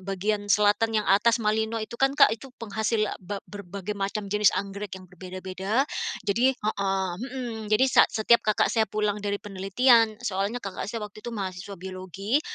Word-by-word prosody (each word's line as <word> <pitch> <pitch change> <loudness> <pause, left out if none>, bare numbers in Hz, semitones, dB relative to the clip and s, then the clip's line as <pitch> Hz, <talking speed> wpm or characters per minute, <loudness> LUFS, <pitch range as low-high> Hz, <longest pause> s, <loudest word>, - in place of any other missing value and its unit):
bagian 205 +2 -2
selatan 210 +2 +3
yang - - -10
atas 225 +3 +4
Malino 220 +1 0
itu 235 +2 -8
kan, 270 +1 +3
Kak, 220 - +7
itu 250 +4 -6
penghasil 220 0 -1
a - - -5
ba 200 +3 -5
berbagai 200 0 -6
macam 200 +1 -3
jenis 210 -1 +5
anggrek 200 0 -4
yang 185 - -12
berbeda-beda, 185 +6 -2 0.4
jadi 245 +6 +2
heeh, 195 -2 -1
hmm, 240 -4 -5
jadi 215 +5 +4
sa - - +8
setiap 235 +1 +3
kakak 215 -1 +1
saya 220 -2 +2
pulang 210 0 -1
dari 205 0 -1
penelitian 215 +4 +3
soalnya 200 +3 -1
kakak 195 -4 -5
saya 220 0 -4
waktu 210 +1 -11
itu 240 - -7
mahasiswa 190 0 -5
biologi, 190 - -2
210 Hz, 170 wpm, -26 LUFS, 195-225 Hz, 0.4 s, sa